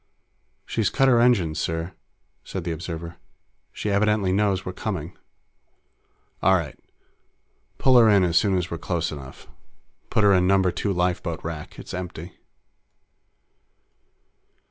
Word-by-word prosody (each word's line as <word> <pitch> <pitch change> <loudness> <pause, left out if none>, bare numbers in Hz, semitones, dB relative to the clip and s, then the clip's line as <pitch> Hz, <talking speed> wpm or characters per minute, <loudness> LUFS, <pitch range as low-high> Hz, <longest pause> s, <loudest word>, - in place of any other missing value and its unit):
"She's 110 -4 0
cut 135 -1 +2
her 120 -3 +5
engines, 95 -11 +2
sir!" 80 +3 -3 0.5
said 95 - -5
the 85 - -3
observer. 85 +1 -6 0.5
"She 105 - -3
evidently 100 -1 +2
knows 95 -1 +1
we're 90 - -4
coming." 90 -4 -5 1.3
"All 95 +1 +5
right. 80 -6 -2 1.0
Pull 130 -2 +5
her 115 -2 +6
in 100 -2 +5
as 85 -2 0
soon 95 +1 +3
as 90 -1 -3
we're 85 - -4
close 85 -2 -2
enough. 65 -3 -10 0.6
Put 110 - +1
her 100 -1 +6
in 90 -1 +3
Number 95 -1 +3
Two 100 - -2
lifeboat 90 -2 -1
rack; 80 -2 -7
it's - - -9
empty." 90 -1 -6
90 Hz, 135 wpm, -24 LUFS, 85-100 Hz, 1.3 s, her